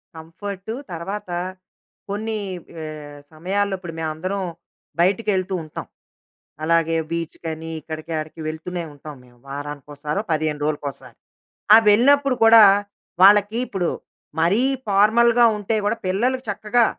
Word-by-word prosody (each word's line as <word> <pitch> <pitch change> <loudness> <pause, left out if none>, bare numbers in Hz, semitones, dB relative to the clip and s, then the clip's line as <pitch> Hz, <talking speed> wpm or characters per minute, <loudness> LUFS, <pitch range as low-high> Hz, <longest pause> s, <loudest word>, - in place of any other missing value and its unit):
Comfort, 195 +6 -7 0.2
తర్వాత 195 +4 -5 0.8
కొన్ని 215 +2 -3 0.4
ఆహ్, 150 -2 -8
సమయాల్లో 195 +5 -1
ఇప్పుడు 170 -3 -8
మేమందరం 165 +5 -3 0.6
బయటికి 200 +4 +2
వెళ్తూ 190 0 -1
ఉంటాం. 155 - -8 0.8
అలాగే, 165 0 +2 0.2
బీచ్‌కని 165 -1 -5
ఇక్కడికి 155 +2 -7
ఆడికి 155 +1 -7
వెళ్తూనే 170 +3 -4
ఉంటాం 145 +1 -10
మేము. 120 -1 -22
వారానికోసారో, 145 +4 -5
15 155 -1 0
రోజులకోసారి. 145 -2 -4 0.6
ఆ! - - +12
వెళ్ళినప్పుడు 275 +5 +4
కూడా 225 -1 +9 0.6
వాళ్లకి 205 +2 +6
ఇప్పుడు 180 -4 -1 0.5
మరీ 190 +8 +3 0.3
ఫార్మల్‌గా 230 +4 +5
ఉంటే 210 +2 -2
గూడా, 210 +3 +1
పిల్లలుకి 250 +7 0
చక్కగా 215 +3 +2
180 Hz, 110 wpm, -22 LUFS, 155-210 Hz, 0.8 s, ఆ